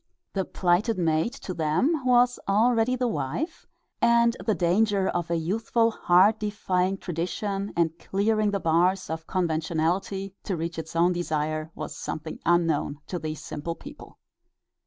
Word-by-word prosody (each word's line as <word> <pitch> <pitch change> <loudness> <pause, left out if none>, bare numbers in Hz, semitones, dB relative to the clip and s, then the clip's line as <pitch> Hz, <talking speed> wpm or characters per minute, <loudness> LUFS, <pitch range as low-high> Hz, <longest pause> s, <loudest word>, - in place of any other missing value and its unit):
The 190 -2 -1
plighted 185 +5 +1
maid 160 +4 +1
to 200 -8 -6
them 170 - +1
was 245 -1 +4
already 230 +4 +3
the 250 0 0
wife, 225 - -3 0.3
and 235 0 +4
the 215 - +1
danger 195 +2 +2
of 170 -1 -2
a 170 - +1
youthful 225 +7 +1
heart 195 +2 +4
defying 195 -3 0
tradition 195 +4 -3
and 165 -1 +2
clearing 215 +2 +1
the 200 -1 -1
bars 175 +2 +2
of 160 0 -5
conventionality 175 +3 -1
to 190 - -2
reach 165 +1 -4
its 160 +1 -8
own 175 +2 +4
desire 155 -2 -2
was - - -6
something 155 0 -6
unknown 165 -4 +2
to 180 - -4
these 155 -1 -5
simple 165 +3 -5
people. - - -12
185 Hz, 145 wpm, -26 LUFS, 165-215 Hz, 0.3 s, was